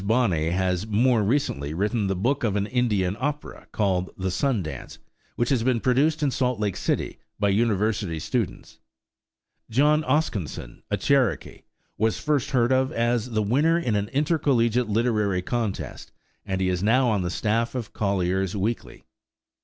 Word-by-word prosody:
Bonney 100 Hz, -8 st, +1 dB
has 90 Hz, +2 st, 0 dB
more 115 Hz, +2 st, +3 dB
recently 100 Hz, -, -1 dB
written 105 Hz, +3 st, 0 dB
the 95 Hz, -, 0 dB
book 125 Hz, +9 st, 0 dB
of 105 Hz, -4 st, +1 dB
an 100 Hz, -1 st, 0 dB
Indian 105 Hz, -6 st, 0 dB
opera 145 Hz, +3 st, -4 dB
called 95 Hz, -3 st, 0 dB
"The 95 Hz, 0 st, -2 dB
Sun 115 Hz, +1 st, 0 dB
Dance," 80 Hz, -, -8 dB, 0.4 s
which 120 Hz, -, 0 dB
has 130 Hz, -4 st, +2 dB
been 120 Hz, 0 st, +1 dB
produced 145 Hz, +6 st, +2 dB
in 140 Hz, -, +2 dB
Salt 125 Hz, -3 st, 0 dB
Lake 105 Hz, -3 st, -1 dB
City -, -, -2 dB, 0.2 s
by 100 Hz, -1 st, +2 dB
university 105 Hz, -4 st, 0 dB
students. 110 Hz, +5 st, -3 dB, 0.9 s
John 150 Hz, +6 st, +3 dB
Oskinson, 100 Hz, -, -2 dB
a -, -, 0 dB
Cherokee, 135 Hz, -6 st, 0 dB, 0.4 s
was 110 Hz, +1 st, +1 dB
first 145 Hz, -2 st, 0 dB
heard 125 Hz, -2 st, +2 dB
of 130 Hz, 0 st, +2 dB
as 120 Hz, 0 st, 0 dB
the 110 Hz, -2 st, 0 dB
winner 145 Hz, +10 st, +2 dB
in 125 Hz, -11 st, 0 dB
an 100 Hz, 0 st, 0 dB
intercollegiate 130 Hz, -6 st, +1 dB
literary 105 Hz, -4 st, +1 dB
contest, 115 Hz, -2 st, -4 dB, 0.4 s
and 95 Hz, -1 st, -1 dB
he 95 Hz, -, +1 dB
is 90 Hz, -1 st, -1 dB
now 125 Hz, +5 st, +3 dB
on 105 Hz, -3 st, +1 dB
the 90 Hz, -, -2 dB
staff 115 Hz, +6 st, -1 dB
of 120 Hz, -3 st, -5 dB
Collier's 95 Hz, -1 st, 0 dB
Weekly. 110 Hz, +4 st, -3 dB
110 Hz, 160 wpm, -25 LUFS, 95-125 Hz, 0.9 s, more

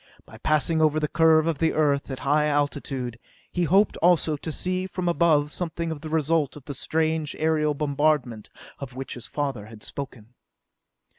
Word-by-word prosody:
By 110 Hz, -, -14 dB
passing 155 Hz, +3 st, +1 dB
over 155 Hz, 0 st, +3 dB
the 150 Hz, -, 0 dB
curve 160 Hz, 0 st, +4 dB
of 165 Hz, -3 st, -1 dB
the 165 Hz, -, +2 dB
Earth 145 Hz, -3 st, +1 dB
at 130 Hz, -, -5 dB
a -, -, -9 dB
high 150 Hz, +2 st, +3 dB
altitude, 140 Hz, -4 st, -2 dB, 0.3 s
he 175 Hz, -1 st, 0 dB
hoped 195 Hz, +5 st, +3 dB
also 165 Hz, -2 st, +3 dB
to 160 Hz, +2 st, -5 dB
see 185 Hz, +3 st, -2 dB
from 180 Hz, -1 st, -4 dB
above 155 Hz, -3 st, +3 dB
something 170 Hz, -1 st, -3 dB
of 150 Hz, -2 st, -6 dB
the 155 Hz, -, -6 dB
result 160 Hz, -1 st, +1 dB
of 145 Hz, -3 st, -12 dB
the 145 Hz, -, -5 dB
strange 155 Hz, +1 st, -1 dB
aerial 155 Hz, -1 st, +1 dB
bombardment 140 Hz, -6 st, 0 dB, 0.3 s
of 135 Hz, -3 st, -8 dB
which 135 Hz, +1 st, -5 dB
his 120 Hz, -, -8 dB
father 135 Hz, -8 st, -3 dB
had 110 Hz, -1 st, -12 dB
spoken. 125 Hz, -4 st, -8 dB
150 Hz, 180 wpm, -25 LUFS, 140-160 Hz, 0.3 s, curve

